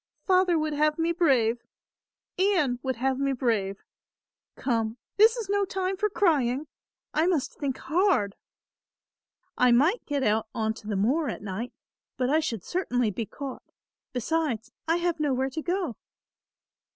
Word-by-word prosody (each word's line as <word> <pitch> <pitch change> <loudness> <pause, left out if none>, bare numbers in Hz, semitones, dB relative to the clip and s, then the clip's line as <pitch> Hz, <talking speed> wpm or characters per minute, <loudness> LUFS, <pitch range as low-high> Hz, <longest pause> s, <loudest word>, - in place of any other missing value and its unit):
"Father 365 -2 +4
would 310 -1 -1
have 300 +1 +2
me 330 +1 +1
brave; 250 -9 +2 0.8
Ian 350 -11 +2
would 260 -1 -1
have 265 +2 0
me 275 0 +1
brave. 215 -6 -1 0.7
Come, 225 -2 -1 0.2
this 445 +3 +6
is 455 -4 -4
no 405 0 +2
time 380 0 -1
for 425 +2 0
crying, 290 -9 +2 0.5
I 315 +3 +2
must 335 -7 0
think 275 -3 -3
hard." 310 - +1 1.2
"I 250 0 +5
might 305 - +3
get 285 -2 0
out 220 -1 +1
on 220 -1 0
to 220 -1 -12
the 210 - -1
moor 270 +11 +1
at - - -6
night, 210 +5 -4 0.5
but 255 0 +1
I 310 - +4
should 230 - -3
certainly 250 - 0
be 215 +3 -4
caught. 275 -3 -7 0.5
Besides 250 -3 -1 0.2
I 330 - +3
have 345 -1 0
nowhere 265 -3 0
to 315 - -3
go. 350 - -2
275 Hz, 150 wpm, -27 LUFS, 235-340 Hz, 1.2 s, this